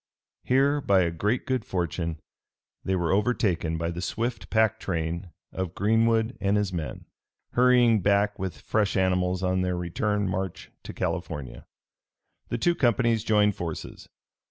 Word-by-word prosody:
Here 140 Hz, +3 st, +2 dB
by 95 Hz, -7 st, +3 dB
great 105 Hz, +9 st, -1 dB
good 130 Hz, -3 st, -1 dB
fortune 85 Hz, -3 st, -3 dB, 0.6 s
they 95 Hz, -, 0 dB
were 85 Hz, -3 st, 0 dB
overtaken 95 Hz, -6 st, +1 dB
by 85 Hz, +1 st, -2 dB
the 85 Hz, +1 st, -5 dB
swift 115 Hz, +6 st, -3 dB
pack 110 Hz, -2 st, +2 dB
train 85 Hz, +1 st, -3 dB, 0.2 s
of 95 Hz, -2 st, -4 dB
Greenwood 115 Hz, +3 st, +2 dB
and 100 Hz, +1 st, +2 dB
his 100 Hz, -3 st, -1 dB
men, 80 Hz, -3 st, -5 dB, 0.5 s
hurrying 120 Hz, -3 st, +4 dB
back 100 Hz, +1 st, +2 dB
with 95 Hz, -1 st, -5 dB
fresh 105 Hz, -3 st, 0 dB
animals 90 Hz, 0 st, +1 dB
on 95 Hz, 0 st, +1 dB
their 90 Hz, -1 st, -1 dB
return 100 Hz, +4 st, -1 dB
march 95 Hz, -1 st, -4 dB
to -, -, -7 dB
California. 65 Hz, -4 st, -4 dB, 0.8 s
The 120 Hz, -, -1 dB
two 175 Hz, +9 st, +2 dB
companies 115 Hz, -5 st, +2 dB
joined 105 Hz, -2 st, +3 dB
forces. 85 Hz, -2 st, -6 dB
100 Hz, 140 wpm, -26 LUFS, 90-115 Hz, 0.8 s, hurrying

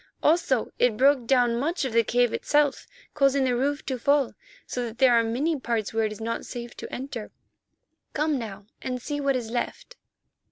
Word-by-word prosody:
Also, 305 Hz, -7 st, +2 dB
it 245 Hz, -3 st, +3 dB
broke 265 Hz, -2 st, +4 dB
down 245 Hz, -2 st, +3 dB
much 320 Hz, +3 st, -1 dB
of 255 Hz, -, -3 dB
the 230 Hz, 0 st, +4 dB
cave 245 Hz, +1 st, +2 dB
itself, 295 Hz, -2 st, +1 dB, 0.3 s
causing 275 Hz, -1 st, +3 dB
the 255 Hz, -2 st, +1 dB
roof 285 Hz, +4 st, -1 dB
to 260 Hz, -2 st, -3 dB
fall, 280 Hz, 0 st, +2 dB, 0.3 s
so 250 Hz, -, -4 dB
that 230 Hz, -1 st, -6 dB
there 260 Hz, -2 st, +5 dB
are 230 Hz, -1 st, +5 dB
many 275 Hz, +7 st, 0 dB
parts 230 Hz, -4 st, -2 dB
where 225 Hz, 0 st, +1 dB
it 215 Hz, -, -2 dB
is 215 Hz, -, -8 dB
not 230 Hz, +1 st, -3 dB
safe 240 Hz, -1 st, -7 dB
to -, -, -8 dB
enter. 250 Hz, -4 st, -6 dB, 0.8 s
Come 300 Hz, -2 st, 0 dB
now 205 Hz, -3 st, -7 dB, 0.2 s
and 255 Hz, -1 st, -3 dB
see 290 Hz, +4 st, -4 dB
what 275 Hz, -1 st, +1 dB
is 235 Hz, -3 st, -3 dB
left." 250 Hz, -, -4 dB
250 Hz, 195 wpm, -26 LUFS, 230-280 Hz, 0.8 s, there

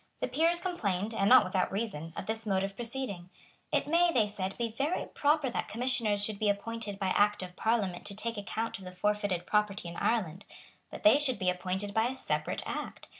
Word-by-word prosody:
The -, -, -1 dB
Peers 335 Hz, +2 st, +2 dB
complained, 220 Hz, -, -2 dB
and 200 Hz, -2 st, +2 dB
not 255 Hz, -, +9 dB
without 185 Hz, 0 st, 0 dB
reason, 190 Hz, -6 st, -3 dB
of -, -, -4 dB
this 220 Hz, +1 st, -3 dB
mode 190 Hz, -1 st, +1 dB
of 195 Hz, 0 st, -4 dB
proceeding. 230 Hz, -6 st, -3 dB, 0.4 s
It -, -, +2 dB
may, 340 Hz, +2 st, +4 dB
they 230 Hz, -8 st, +3 dB
said, 195 Hz, -2 st, -4 dB
be 235 Hz, -2 st, -1 dB
very 280 Hz, +9 st, -1 dB
proper 295 Hz, -1 st, +1 dB
that -, -, -2 dB
Commissioners 230 Hz, -4 st, +1 dB
should 210 Hz, -2 st, -4 dB
be 215 Hz, -, +2 dB
appointed 210 Hz, 0 st, -2 dB
by 195 Hz, -1 st, -1 dB
Act 205 Hz, +1 st, +3 dB
of 180 Hz, -1 st, -8 dB
Parliament 205 Hz, -6 st, 0 dB
to 200 Hz, -, -3 dB
take 230 Hz, +2 st, -2 dB
account 220 Hz, +1 st, -3 dB
of 190 Hz, -, -11 dB
the 180 Hz, -, -7 dB
forfeited 200 Hz, -2 st, 0 dB
property 210 Hz, -4 st, 0 dB
in 170 Hz, -, -7 dB
Ireland. 195 Hz, -5 st, 0 dB, 0.4 s
But -, -, -9 dB
they 310 Hz, -3 st, +7 dB
should 270 Hz, -4 st, 0 dB
be 180 Hz, -1 st, +2 dB
appointed 190 Hz, +3 st, -3 dB
by 220 Hz, +2 st, +3 dB
a 260 Hz, -, -4 dB
separate -, -, -2 dB
Act. -, -, -5 dB
210 Hz, 210 wpm, -31 LUFS, 190-235 Hz, 0.4 s, not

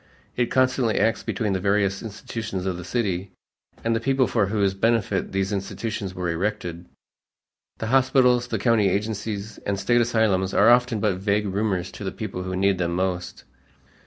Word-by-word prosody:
It 125 Hz, -1 st, +1 dB
constantly 130 Hz, -3 st, +2 dB
acts 110 Hz, 0 st, +2 dB
between 105 Hz, -4 st, -2 dB
the 95 Hz, -, 0 dB
various 100 Hz, 0 st, +1 dB
institutions 105 Hz, -3 st, -5 dB
of 95 Hz, -2 st, -1 dB
the 90 Hz, -, -7 dB
city 95 Hz, -3 st, -2 dB, 0.5 s
and 115 Hz, 0 st, +1 dB
the -, -, +1 dB
people 135 Hz, +2 st, +2 dB
for 105 Hz, -5 st, +1 dB
whose 100 Hz, -2 st, +1 dB
benefit 105 Hz, -1 st, 0 dB
these 95 Hz, +1 st, -1 dB
institutions 100 Hz, 0 st, -4 dB
were 90 Hz, -1 st, -2 dB
erected. 85 Hz, -1 st, -3 dB, 0.9 s
The -, -, -4 dB
hospitals, 130 Hz, -2 st, +4 dB
the 115 Hz, -, -2 dB
county 105 Hz, -2 st, +3 dB
agencies, 105 Hz, +1 st, -3 dB
and 100 Hz, -1 st, -2 dB
State 120 Hz, +5 st, +3 dB
asylums 110 Hz, -5 st, +1 dB
are 110 Hz, +4 st, +6 dB
often 120 Hz, -3 st, +3 dB
but 100 Hz, -4 st, +1 dB
vague 100 Hz, +2 st, 0 dB
rumors 95 Hz, -2 st, -1 dB
to -, -, -9 dB
the 95 Hz, -, -2 dB
people 100 Hz, -4 st, -5 dB
who 95 Hz, 0 st, -4 dB
need 95 Hz, 0 st, +2 dB
them 85 Hz, -1 st, -1 dB
most. 90 Hz, -1 st, -2 dB
100 Hz, 170 wpm, -24 LUFS, 95-115 Hz, 0.9 s, are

